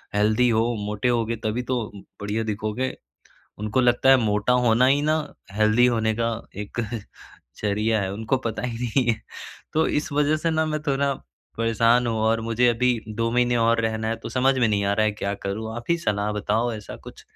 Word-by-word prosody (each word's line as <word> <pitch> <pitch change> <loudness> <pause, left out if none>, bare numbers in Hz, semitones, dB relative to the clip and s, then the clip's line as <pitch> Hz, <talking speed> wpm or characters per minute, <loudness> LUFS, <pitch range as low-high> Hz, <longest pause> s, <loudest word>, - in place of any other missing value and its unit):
healthy 110 +4 +3
हो, 115 +1 +2
मोटे 105 +3 -2
होगे 115 -1 0
तभी 110 +3 -1
तो 125 - +1 0.4
बढ़िया 105 +2 -2
दिखोगे" 110 +4 -3 0.6
उनको 105 +5 0
लगता 120 +2 +3
है 135 - +8
मोटा 105 +4 +1
होना 115 +3 +4
ही 140 +2 +3
ना, 155 +1 +2 0.3
हेल्दी 110 +4 +3
होने 110 -2 +1
का 115 0 0 0.3
एक 110 - -7 0.8
ज़रिया 105 +1 +1
है, 95 - -2
उनको 110 +5 -1
पता 110 - -4
ही 120 -2 -3
नहीं 125 +2 +1
है 110 - -5 0.5
तो 160 +1 +2
इस 150 - -1
वजह 150 +2 +2
से 165 +2 -1
ना 160 0 +1
मैं 155 -1 -2
थोड़ा 140 0 +1 0.4
परेशान 115 +1 +3
हूँ 115 -1 -1
और 110 +1 +2
मुझे 115 +2 +2
अभी 120 0 +1
2 115 +2 -1
महीने 120 0 +2
और 115 0 +3
रहना 110 0 -1
है 115 - 0
तो - - -6
समझ 130 +1 +2
में 120 -3 +3
नहीं 100 -1 +1
आ 100 - +2
रहा 110 +1 +2
है 105 - +2
क्या 100 -1 -3
करूँ 110 +3 -3
आप 120 - -6
ही 170 - +3
सलाह 105 -7 -1
बताओ 110 +3 0
ऐसा 105 -2 -8
कुछ - - -13
115 Hz, 200 wpm, -24 LUFS, 110-125 Hz, 0.8 s, है